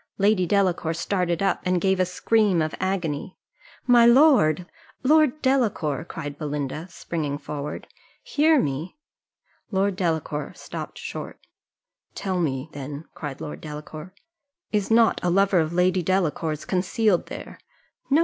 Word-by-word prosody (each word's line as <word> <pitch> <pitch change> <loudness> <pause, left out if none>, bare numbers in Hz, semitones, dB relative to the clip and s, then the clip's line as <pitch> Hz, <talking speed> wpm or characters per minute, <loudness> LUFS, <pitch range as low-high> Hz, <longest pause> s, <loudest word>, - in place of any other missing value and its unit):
Lady 200 -2 +3
Delacour 180 -5 +1
started 180 0 -1
up, 195 - +1
and 180 0 +1
gave 190 +1 +1
a 185 - +2
scream 205 0 +2
of 155 -1 -1
agony. 180 -3 -2 0.5
"My 245 -2 +6
lord! 235 - +5 0.4
Lord 305 0 +4
Delacour," 205 - +1
cried 145 -4 -7
Belinda, 150 +1 -3
springing 155 -4 -4
forward, 145 0 -6 0.4
"hear 310 +1 +3
me." 150 - -3 0.7
Lord 195 -1 +1
Delacour 160 -5 -2
stopped - - -7
short. - - -7 0.7
"Tell 185 -2 -2
me, 135 -4 -1
then," 145 +2 -7
cried 145 -4 -7
Lord 150 - -6
Delacour, 155 +3 -8 0.6
"is 205 -2 0
not 225 -1 +4
a 180 - +2
lover 195 +1 +3
of 160 -1 0
Lady 180 +1 +2
Delacour's 160 -4 -1
concealed 190 +2 +1
there?" - - -9 0.5
"No! 285 +3 +5
180 Hz, 130 wpm, -24 LUFS, 155-200 Hz, 0.7 s, My